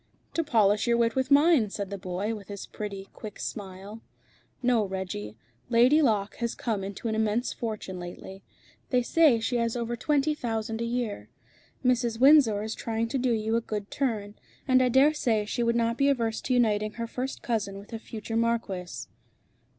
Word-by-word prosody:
"To 330 - +1
polish 215 -6 +3
your 235 0 +3
wit 230 -1 +2
with 260 0 0
mine," 285 -5 +5
said 200 -1 -5
the 200 - -3
boy, 185 +4 -3
with 205 -3 -8
his 200 -1 -7
pretty, 200 -2 -7
quick 215 -3 -9
smile. 200 +1 -7 0.6
"No, 240 -3 +3
Reggie. 185 - -5 0.3
Lady 250 +6 +5
Locke 210 -7 +1
has 235 -1 -2
come 215 -5 -2
into 200 +4 -5
an 220 - -1
immense 220 +2 0
fortune 215 -5 -5
lately. 185 +2 -9 0.5
They 250 -1 +2
say 295 -3 +4
she 235 +2 -1
has 230 0 0
over 240 0 -2
twenty 295 +4 +1
thousand 225 -4 -3
a - - 0
year. 230 - -3 0.6
Mrs. 240 -2 +1
Windsor 260 -7 +6
is 220 +1 -3
trying 230 0 -2
to 270 - -1
do 250 0 +1
you 220 0 0
a 230 - +2
good 210 -2 -5
turn. 215 -7 -2 0.3
And 255 -1 +5
I 250 - +3
dare 270 +5 +5
say 225 -8 +1
she 240 - -2
would 235 0 +2
not 230 0 0
be 280 0 +4
averse 230 -5 0
to 255 - -1
uniting 215 -3 +2
her 230 - -4
first 255 +3 -5
cousin 210 -4 -2
with 200 +3 -12
a 225 - -4
future 225 0 -6
marquis." 195 - -1
225 Hz, 190 wpm, -27 LUFS, 205-245 Hz, 0.6 s, Windsor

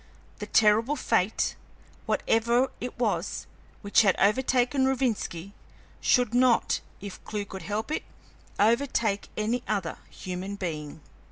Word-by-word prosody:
The - - -5
terrible 225 +6 +4
fate, 225 -6 0 0.5
whatever 235 +3 +2
it 250 - -6
was, 205 -7 -1 0.4
which 205 +2 +4
had 195 -4 +4
overtaken 255 +5 +2
Rovinski, 230 -9 -1 0.5
should 245 -3 +2
not, 245 -1 +3 0.2
if 200 -2 -8
Clewe 210 -1 -4
could 190 -1 -8
help 215 +6 -3
it, 310 - -1 0.6
overtake 225 -2 +1
any 225 +3 0
other 195 -6 -2
human 185 +2 -6
being. 155 -6 -5
220 Hz, 115 wpm, -27 LUFS, 200-245 Hz, 0.6 s, terrible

